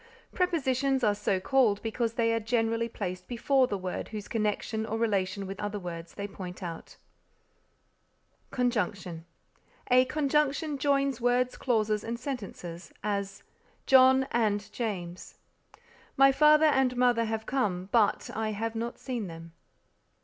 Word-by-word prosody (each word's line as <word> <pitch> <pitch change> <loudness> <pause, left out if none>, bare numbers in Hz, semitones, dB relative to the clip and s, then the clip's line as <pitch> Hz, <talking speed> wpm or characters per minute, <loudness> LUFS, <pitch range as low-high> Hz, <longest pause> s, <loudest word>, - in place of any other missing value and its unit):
Prepositions 275 -7 +1
are 210 -2 +4
so 205 -2 0
called 225 -1 +2
because 225 0 -1
they 230 -1 +1
are 230 - +1
generally 230 0 0
placed 185 -4 -5
before 255 +2 +2
the 200 - -2
words 185 -1 -5
whose 210 -2 -6
connection 220 0 -1
or 220 0 -3
relation 200 -3 0
with 195 +1 -7
other 205 0 -3
words 170 -3 -7
they 200 0 -4
point 185 -2 -8
out. 165 -2 -7 1.5
CONJUNCTION 205 -9 -2 0.7
A 255 +1 +6
conjunction 295 +1 0
joins 275 -2 +1
words, 245 +1 +2
clauses 215 -4 0
and 235 +1 -4
sentences; 200 - -6
as 200 -2 -3 0.4
"John 265 0 +6
and 210 -3 0
James." 185 -7 -5 0.8
"My 275 0 +7
father 300 +2 +5
and 265 -4 +3
mother 245 -2 +3
have 220 0 -3
come, 195 -9 -1
but 220 -4 +2
I 220 -1 -2
have 225 +2 -3
not 230 +1 -4
seen 240 -6 -4
them." 165 0 -10
225 Hz, 135 wpm, -29 LUFS, 200-255 Hz, 1.5 s, My